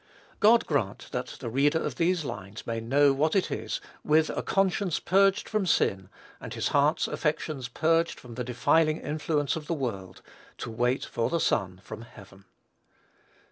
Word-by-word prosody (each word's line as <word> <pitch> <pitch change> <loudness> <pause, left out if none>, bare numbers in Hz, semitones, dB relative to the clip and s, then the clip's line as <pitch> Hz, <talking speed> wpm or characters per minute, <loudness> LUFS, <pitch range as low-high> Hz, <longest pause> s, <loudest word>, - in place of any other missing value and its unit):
God 225 +2 +5
grant 115 -10 -2
that 125 +1 -3
the 120 - -4
reader 145 +5 +3
of - - -3
these 170 -2 +1
lines 100 -4 -7
may 115 0 -2
know 135 +5 +3
what 155 +5 +1
it 195 - +1
is, - - -3 0.2
with 155 +1 +3
a - - -2
conscience 195 -2 +1
purged 195 +1 +3
from 215 -3 -1
sin, 95 - +1 0.3
and - - -7
his - - -1
heart's - - +2
affections 135 -5 -2
purged 165 +6 +1
from 120 -2 -11
the 125 +2 -4
defiling 150 +6 +2
influence 150 -1 -1
of 155 -2 -6
the 165 - -1
world, 100 - -5 0.3
to - - -6
wait 125 +3 0
for 115 - -2
the 170 - 0
Son 95 - 0
from 110 +4 -8
heaven. 100 -4 -15
145 Hz, 170 wpm, -27 LUFS, 115-165 Hz, 0.3 s, God